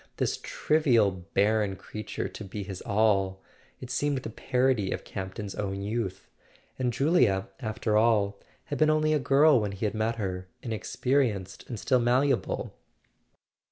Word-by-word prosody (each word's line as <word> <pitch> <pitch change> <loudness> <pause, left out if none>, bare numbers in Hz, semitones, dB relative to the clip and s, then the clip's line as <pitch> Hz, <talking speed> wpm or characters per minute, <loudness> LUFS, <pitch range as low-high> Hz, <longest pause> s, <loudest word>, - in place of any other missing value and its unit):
This - - 0
trivial 125 -10 +2 0.2
barren 105 -1 +2
crea¬ 105 +3 -8
ture - - -3
to - - -9
be 100 +1 -6
his 95 -2 -7
all—it 100 +3 -1
seemed 145 +2 0
the - - -5
parody 125 -4 +1
of - - -3
Campton's 95 +1 -6
own 100 -1 -3
youth! 105 -2 -3 0.5
And 125 -1 +1
Julia, 120 - +2
after 110 -1 -1
all, 105 -3 +2 0.2
had 145 - -5
been 155 0 +5
only 155 0 +3
a 150 - +3
girl 140 -1 +5
when 105 -1 -2
he 100 +3 -3
had 105 - 0
met 110 +1 0
her, 95 -4 -4 0.2
inexperienced 115 -2 -1
and 115 -4 -5
still 130 +4 +2
malle¬ 125 +4 +3
able. 125 - -2
110 Hz, 155 wpm, -28 LUFS, 100-130 Hz, 0.5 s, been